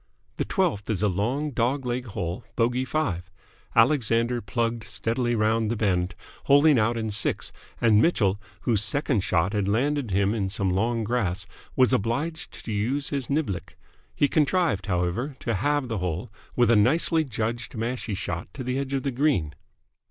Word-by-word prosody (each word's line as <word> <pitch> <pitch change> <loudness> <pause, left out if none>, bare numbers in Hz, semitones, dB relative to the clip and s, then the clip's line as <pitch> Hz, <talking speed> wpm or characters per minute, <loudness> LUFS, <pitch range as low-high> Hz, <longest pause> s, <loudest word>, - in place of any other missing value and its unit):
The - - -1
twelfth 170 - 0
is 105 -2 0
a - - +4
long, 120 +11 -1
dog 130 +2 0
leg 125 +1 -2
hole, 95 -4 -4
bogey 125 +2 +1
five. 95 - -2 0.5
Alexander 120 -3 +3
plugged 115 +2 -1
steadily 120 +3 -1
round 110 0 +1
the 120 - 0
bend, 95 -3 0 0.3
holing 145 -1 +6
out 115 +2 +1
in 110 -1 -2
six, 105 +2 0 0.3
and 110 -2 +5
Mitchell, 105 - +2 0.2
whose 110 -5 +1
second 130 +1 +1
shot 95 +1 +1
had 105 -2 0
landed 135 +4 +1
him 100 +2 +2
in 100 -4 -1
some 95 -1 -1
long 115 +5 0
grass, 105 -5 -1 0.3
was 130 0 +4
obliged 135 +9 -2
to - - -4
use 120 +8 0
his 140 -4 -1
niblick. 140 - -2 0.4
He 145 - +3
contrived, 150 - +1
however, 95 +10 -1
to 115 - -1
halve 145 +6 0
the 115 -4 -2
hole 90 +2 -3 0.2
with 120 -2 +4
a - - +6
nicely 160 +9 +3
judged 115 -2 -3
mashie 115 -1 -3
shot 90 -3 -4
to 130 - -5
the 125 +2 -1
edge 140 0 -3
of 135 -2 0
the 140 - -1
green. 125 - +1
115 Hz, 170 wpm, -26 LUFS, 100-135 Hz, 0.5 s, holing